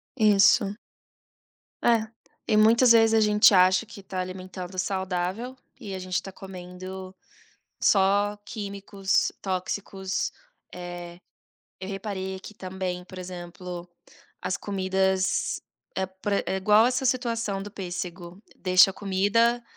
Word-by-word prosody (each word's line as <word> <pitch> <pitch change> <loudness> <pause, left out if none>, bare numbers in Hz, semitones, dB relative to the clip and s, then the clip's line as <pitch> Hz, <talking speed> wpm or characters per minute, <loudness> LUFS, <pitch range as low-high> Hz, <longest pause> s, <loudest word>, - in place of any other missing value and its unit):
Isso. 205 -2 +5 1.1
É, 230 -2 +3 0.4
e 215 - +2
muitas 230 +3 +6
vezes 225 -1 +6
a - - +5
gente 210 0 +6
acha 185 +3 +5
que 200 - -11
está 190 -1 -5
alimentando 185 0 -7
saudável, 190 +5 -2 0.2
e 195 -2 -6
a 185 - -5
gente 185 0 -7
está 195 - -1
comendo 185 0 -9 0.7
só 200 +1 +3
químicos 200 -2 -1
tóxicos. 190 0 -2 0.4
Eh, 175 -1 -8 0.6
eu 190 - -6
reparei 195 -1 -4
aqui 205 +2 -11
também, 185 -1 -4
por 185 0 -11
exemplo, 180 0 -7 0.5
as 185 - -1
comidas, 190 -1 0 0.4
é 190 0 0
por 190 +2 -5
ex 200 - +1
igual 210 +4 +4
essa 255 +1 0
situação 230 -5 0
do 205 - -8
pêssego, 180 -2 -6 0.2
deixa 185 0 +6
a - - -27
comida 210 +5 +2
190 Hz, 120 wpm, -26 LUFS, 185-210 Hz, 1.1 s, muitas